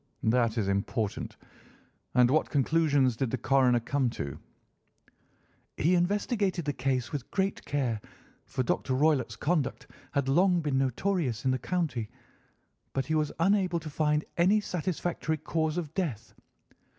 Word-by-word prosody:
That 115 Hz, 0 st, +2 dB
is 105 Hz, -4 st, 0 dB
important. 100 Hz, +2 st, -2 dB, 0.8 s
And 125 Hz, 0 st, +5 dB
what 155 Hz, +2 st, +2 dB
conclusions 145 Hz, -3 st, +2 dB
did 130 Hz, +1 st, -1 dB
the 130 Hz, -, -1 dB
coroner 130 Hz, -1 st, +3 dB
come 130 Hz, +2 st, 0 dB
to?" 70 Hz, -1 st, -5 dB, 1.4 s
"He 165 Hz, +5 st, +3 dB
investigated 190 Hz, -, +1 dB
the 145 Hz, -, 0 dB
case 130 Hz, -2 st, -1 dB
with 140 Hz, -5 st, -5 dB
great 195 Hz, 0 st, -1 dB
care, 125 Hz, -7 st, -1 dB, 0.5 s
for 130 Hz, -, -1 dB
Dr. 130 Hz, +2 st, 0 dB
Roylott's 140 Hz, -3 st, +2 dB
conduct 150 Hz, -4 st, -1 dB, 0.3 s
had 140 Hz, -1 st, 0 dB
long 180 Hz, +6 st, +4 dB
been 145 Hz, -4 st, 0 dB
notorious 135 Hz, -, -1 dB
in 130 Hz, -, +3 dB
the 130 Hz, -, 0 dB
county, 145 Hz, -12 st, -2 dB, 0.8 s
but 135 Hz, -1 st, -1 dB
he 160 Hz, -, -2 dB
was 155 Hz, -1 st, +1 dB
unable 185 Hz, -1 st, +2 dB
to 155 Hz, -1 st, -8 dB
find 150 Hz, 0 st, +1 dB
any 190 Hz, +5 st, +4 dB
satisfactory 175 Hz, -4 st, -2 dB
cause 160 Hz, +1 st, -1 dB
of 160 Hz, -4 st, -4 dB
death. 150 Hz, -, -3 dB
145 Hz, 140 wpm, -29 LUFS, 125-170 Hz, 1.4 s, And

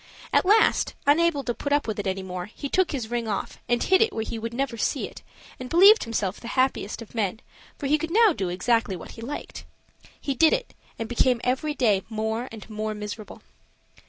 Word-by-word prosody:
At -, -, +3 dB
last, 430 Hz, +2 st, +4 dB
unable 295 Hz, 0 st, +3 dB
to 240 Hz, -, -1 dB
put 285 Hz, -, -5 dB
up 290 Hz, -2 st, +2 dB
with 215 Hz, -1 st, -3 dB
it 200 Hz, -, -2 dB
any 190 Hz, 0 st, -2 dB
more, 180 Hz, -1 st, -5 dB
he 280 Hz, +6 st, -7 dB
took 375 Hz, +3 st, +2 dB
his 245 Hz, -6 st, -4 dB
ring 235 Hz, -1 st, -1 dB
off 205 Hz, -3 st, -3 dB
and 240 Hz, 0 st, +2 dB
hid 380 Hz, +1 st, +4 dB
it 450 Hz, -1 st, +3 dB
where 220 Hz, -, -3 dB
he 225 Hz, 0 st, -5 dB
would 230 Hz, +1 st, -4 dB
never 260 Hz, 0 st, -2 dB
see 225 Hz, -, -1 dB
it; -, -, -12 dB, 0.4 s
and 255 Hz, 0 st, -7 dB
believed 395 Hz, -, +7 dB
himself 210 Hz, -4 st, -2 dB
the 235 Hz, -, -9 dB
happiest 255 Hz, -4 st, 0 dB
of 225 Hz, -, -18 dB
men, 220 Hz, -2 st, -1 dB, 0.4 s
for 285 Hz, -, -6 dB
he 300 Hz, +2 st, +3 dB
could 325 Hz, -, -3 dB
now 430 Hz, +1 st, +5 dB
do 190 Hz, -10 st, -2 dB
exactly 205 Hz, +2 st, +1 dB
what 170 Hz, -, -9 dB
he 230 Hz, -, -11 dB
liked. 280 Hz, +6 st, -6 dB, 0.6 s
He 275 Hz, -, -2 dB
did 315 Hz, +5 st, +4 dB
it, -, -, -2 dB, 0.2 s
and 225 Hz, -, -4 dB
became 245 Hz, +1 st, +2 dB
every 265 Hz, +4 st, 0 dB
day 210 Hz, -8 st, +3 dB
more 220 Hz, +2 st, -2 dB
and 220 Hz, -2 st, -10 dB
more 215 Hz, 0 st, -4 dB
miserable. 210 Hz, 0 st, -8 dB
235 Hz, 215 wpm, -25 LUFS, 215-290 Hz, 0.6 s, believed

